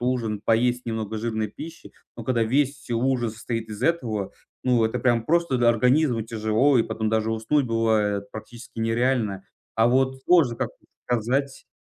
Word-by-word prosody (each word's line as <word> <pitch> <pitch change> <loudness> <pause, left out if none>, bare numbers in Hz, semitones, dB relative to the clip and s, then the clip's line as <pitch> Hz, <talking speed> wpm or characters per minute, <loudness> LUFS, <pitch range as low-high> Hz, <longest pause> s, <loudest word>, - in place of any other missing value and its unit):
ужин 120 -4 -1
поесть 120 +2 +1
немного 110 -1 -3
жирной 110 -1 -2
пищи. 165 +9 -10 0.2
Но - - -6
когда 120 -3 +1
весь, 140 +4 +1
все 120 -4 -5
ужин 120 -1 0
состоит 115 0 -5
из 105 -1 -7
этого, 115 - -1 0.3
ну, 125 -3 +3
это 110 - -1
прям 120 -3 +1
просто, 170 -4 +1
да, 120 - +4
организму 125 +1 +3
тяжело. 115 +4 +2
И - - +4
потом 110 -1 -3
даже 110 0 0
уснуть 125 +5 +1
бывает 105 -3 0
практически 115 +2 -10
нереально. 115 -3 0 0.3
А 115 +1 +4
вот 130 +1 +1
сложно 160 -9 +4
как-то - - -5 0.2
сказать 130 +4 -1
115 Hz, 165 wpm, -24 LUFS, 110-130 Hz, 0.3 s, да